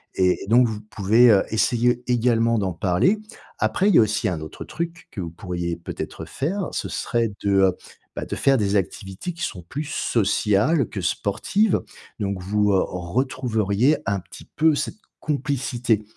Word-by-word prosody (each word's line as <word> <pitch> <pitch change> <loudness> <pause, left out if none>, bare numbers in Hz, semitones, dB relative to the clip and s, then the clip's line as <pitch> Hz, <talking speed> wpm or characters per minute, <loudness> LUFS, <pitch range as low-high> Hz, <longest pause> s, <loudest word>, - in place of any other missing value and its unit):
et 90 -1 +2
et - - -10
donc 120 +4 +5
vous 110 -2 -4
pouvez, 110 +3 +4
heu, 100 - +5
essayer 120 +3 +1
également 115 -1 +2
d'en 95 -2 -1
parler. 90 - +2 0.4
Après, 195 +3 +2
il - - +4
y - - +8
a - - +8
aussi 105 0 +1
un 85 -3 -3
autre 80 - -8
truc 170 +1 -5
que - - -8
vous 85 - -4
pourriez 85 -1 -4
peut-être 85 - -7
faire. 180 +7 -2
Ce - - -3
serait 115 -3 -1
de, 95 -2 +3 0.4
bah, - - -4
de - - -4
faire 135 -1 +3
des 100 -3 0
activités 95 - -3
qui 170 0 -7
sont 95 - -4
plus 145 - -5
sociales 115 +1 +1
que 100 - -5
sportives. 185 - +1 0.4
Donc, 100 -2 -2
vous, 105 +2 +1
heu, 95 - +3
retrouveriez 115 - 0
un 100 0 0
petit - - -13
peu 160 0 +4
cette - - -3 0.2
complicité, 130 -6 -1
110 Hz, 170 wpm, -23 LUFS, 95-135 Hz, 0.4 s, y